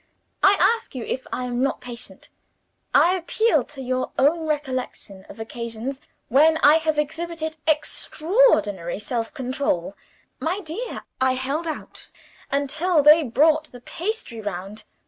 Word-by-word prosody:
I 395 +1 +6
ask 455 - +2
you 250 - -4
if 260 - -4
I 250 - -2
am 245 0 -2
not 275 - 0
patient; 245 -1 -9 0.6
I 355 - +5
appeal 435 +6 +1
to 275 -3 -9
your 255 0 -2
own 315 +4 +2
recollection 255 -9 -4
of - - -12
occasions 235 +4 -5 0.3
when 310 +5 +5
I 300 +2 +8
have 315 -1 -1
exhibited 320 +1 -3
extraordinary 310 - +2
self 225 +2 -3
control. 255 - -2 0.4
My 355 +5 -1
dear, 400 +7 -6 0.2
I 260 0 +3
held 275 +6 -2
out 315 - -7 0.4
until 290 +4 +1
they 300 +3 +8
brought 305 +4 +3
the 245 -5 -12
pastry 340 - -4
round. 205 +1 -6
285 Hz, 135 wpm, -23 LUFS, 245-320 Hz, 0.6 s, I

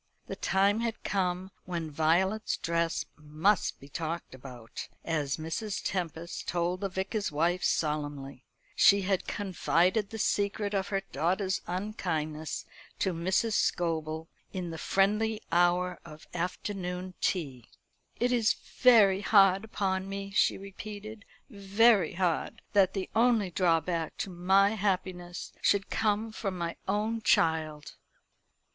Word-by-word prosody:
The - - -6
time 200 +3 +2
had 230 -1 -3
come 185 -1 -1
when 170 -3 -4
Violet's 175 +8 +1
dress 170 0 -1
must 155 +7 +1
be 140 - -13
talked 165 +2 -4
about, 125 -3 -9 0.2
as 150 -4 -1
Mrs. 165 +7 -3
Tempest 170 -2 -3
told 175 +1 -1
the 195 - -1
Vicar's 190 +2 -2
wife 170 +4 +1
solemnly. 145 -4 -1 0.3
She 200 0 +6
had 190 -1 0
confided 190 +1 +1
the 225 - -6
secret 205 0 0
of 195 -1 0
her 195 -1 -1
daughter's 185 +6 0
unkindness 165 -5 -3 0.3
to 190 - 0
Mrs. 190 +7 0
Scobel, 160 -4 0 0.2
in 180 -3 -4
the 160 - -6
friendly 210 +4 +1
hour 175 +1 +2
of 155 -2 -12
afternoon 180 +1 -4
tea. 135 - -2 0.5
"It 245 +1 +2
is 235 -3 +3
very 210 -6 +4
hard 195 -1 +5
upon 195 -3 -2
me," 195 0 -5
she 195 - +3
repeated 210 +2 -9 0.2
"very 200 - +3
hard 175 -3 -1
that 195 -2 +4
the 190 -1 -2
only 225 -5 +3
drawback 170 -2 0
to 195 - -4
my 190 +3 +4
happiness 185 -4 -2
should 200 -1 +2
come 215 +1 0
from 195 -4 -4
my 170 -1 -3
own 215 +3 0
child." 155 -5 +1
185 Hz, 125 wpm, -29 LUFS, 165-200 Hz, 0.5 s, She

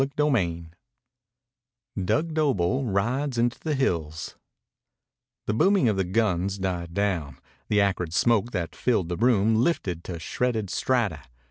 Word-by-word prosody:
CHAPTER 140 +2 -1
XXXVIII 85 - 0 1.3
DUG 155 - 0
DOBLE 135 - +1
RIDES 120 +6 -1
INTO 120 0 +1
THE 155 -2 -2
HILLS 80 - -2 1.1
The 105 - 0
booming 185 - +3
of 105 - +1
the 95 - +1
guns 95 -1 0
died 90 -3 -3
down. 85 -10 -1 0.3
The 105 -1 +3
acrid 90 -4 0
smoke 115 +4 +2
that 90 -7 -4
filled 105 -9 0
the 90 - -1
room 110 -2 +3
lifted 100 - 0
to 90 - -5
shredded 110 +4 -2
strata. 110 - 0
105 Hz, 135 wpm, -26 LUFS, 90-125 Hz, 1.3 s, booming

